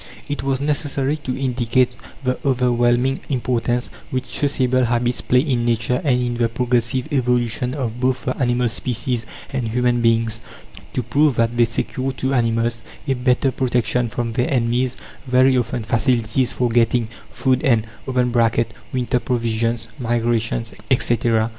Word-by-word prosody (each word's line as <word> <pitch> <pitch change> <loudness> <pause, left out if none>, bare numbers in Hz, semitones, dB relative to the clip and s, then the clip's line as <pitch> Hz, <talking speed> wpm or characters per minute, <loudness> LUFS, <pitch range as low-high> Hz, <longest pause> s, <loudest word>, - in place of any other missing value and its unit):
It 145 -1 -3
was 135 -1 0
necessary 145 -1 0
to 130 -4 -4
indicate 125 -1 +1 0.3
the 130 -1 0
overwhelming 125 0 +2
importance 120 -2 -1 0.2
which 130 0 -3
sociable 130 -3 +2
habits 120 +1 0
play 125 0 +3
in 130 -5 0
Nature 120 +1 +1
and 130 -5 +2
in 120 -1 -1
the 120 -1 +2
progressive 120 +1 0
evolution 125 -1 0
of 125 -4 -3
both 130 -1 0
the 130 - -1
animal 120 0 +2
species 120 0 -2 0.3
and 125 -3 -1
human 120 +1 +1
beings: 115 -1 +2 0.5
to 125 - -1
prove 140 +3 +2
that 115 +1 +1
they 120 0 +5
secure 130 +3 -2
to 130 +1 -2
animals 115 -1 +1 0.3
a 135 - +2
better 125 +1 +1
protection 125 -2 0
from 115 +1 -3
their 120 +2 0
enemies, 125 0 +1 0.3
very 130 +1 +4
often 120 -1 -1
facilities 115 +1 +1
for 125 -1 0
getting 115 0 +2 0.2
food 130 0 0
and 115 -7 +3 0.2
(winter 125 0 0
provisions, 115 -1 -1
migrations, 115 -1 0 0.2
etc.) 115 -3 +2
125 Hz, 140 wpm, -21 LUFS, 115-130 Hz, 0.5 s, they